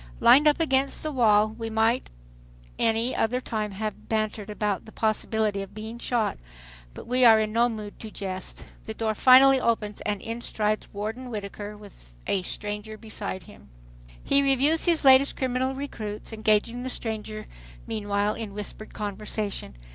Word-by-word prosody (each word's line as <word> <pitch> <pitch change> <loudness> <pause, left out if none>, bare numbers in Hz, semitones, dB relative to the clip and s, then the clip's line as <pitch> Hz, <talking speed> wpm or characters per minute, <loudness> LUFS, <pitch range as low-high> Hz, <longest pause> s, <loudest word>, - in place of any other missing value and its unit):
Lined 290 +4 +7
up 300 - +4
against 275 -2 +1
its 305 - -2
wall, 215 -4 +4
we 225 +1 -6
might 225 +3 +1 0.7
any 225 +3 +1
other 245 +3 +1
time 215 -4 -3
have 215 +2 -5
bantered 215 -1 -1
about 210 -2 -2
the 220 - -12
possibility 215 -2 0
of 195 - -9
being 220 +2 -7
shot, 235 - -1 0.6
but - - -9
we 250 +1 +2
are 225 -2 +8
in 215 0 -1
no 235 +1 +3
mood 215 -3 -7
to 220 - -7
jest. 190 -3 -5 0.2
The 220 - -5
door 220 -1 -1
finally 265 +4 +7
opens 215 -3 -1
and 205 -1 -2
in 230 +3 -5
strides 215 -2 -1
Warden 220 +5 -5
Whittaker 210 -1 -6
with 195 - -15
a 195 - +1
stranger 210 +3 -5
beside 210 -4 -6
him. 65 - -16 0.5
He 280 - +4
reviews 280 +4 +2
his 335 -4 +2
latest 265 +1 +6
criminal 260 0 -1
recruits, 220 -6 -6
engaging 220 +2 +1
the 260 - -4
stranger 215 -3 -4 0.4
meanwhile 205 -1 -1
in 215 -3 -7
whispered 210 +1 -7
conversation. 205 - -4
220 Hz, 160 wpm, -26 LUFS, 210-245 Hz, 0.7 s, are